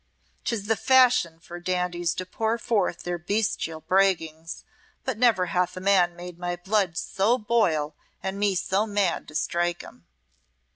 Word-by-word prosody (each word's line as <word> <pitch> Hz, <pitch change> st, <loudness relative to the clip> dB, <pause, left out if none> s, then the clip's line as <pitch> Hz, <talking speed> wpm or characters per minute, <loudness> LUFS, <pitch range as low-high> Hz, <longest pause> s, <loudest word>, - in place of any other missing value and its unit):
'Tis 220 Hz, -4 st, -2 dB
the 225 Hz, +1 st, +2 dB
fashion 250 Hz, -9 st, +4 dB
for 170 Hz, +1 st, -9 dB
dandies 175 Hz, -1 st, -1 dB
to 185 Hz, -, -4 dB
pour 220 Hz, +4 st, -1 dB
forth 220 Hz, -6 st, 0 dB
their 175 Hz, 0 st, -3 dB
bestial 175 Hz, -3 st, -1 dB
braggings, 165 Hz, -2 st, 0 dB, 0.4 s
but 260 Hz, -, -1 dB
never 220 Hz, -5 st, +3 dB
hath 180 Hz, 0 st, 0 dB
a -, -, -3 dB
man 185 Hz, -2 st, +3 dB
made 175 Hz, 0 st, -9 dB
my 175 Hz, 0 st, -2 dB
blood 190 Hz, -1 st, 0 dB
so 205 Hz, +9 st, +1 dB
boil 175 Hz, -10 st, +1 dB, 0.3 s
and 190 Hz, +1 st, -3 dB
me 205 Hz, -2 st, +2 dB
so 195 Hz, +4 st, 0 dB
mad 205 Hz, -4 st, 0 dB
to 150 Hz, -, -12 dB
strike 175 Hz, +1 st, 0 dB
him." -, -, -15 dB
185 Hz, 155 wpm, -26 LUFS, 175-210 Hz, 0.4 s, fashion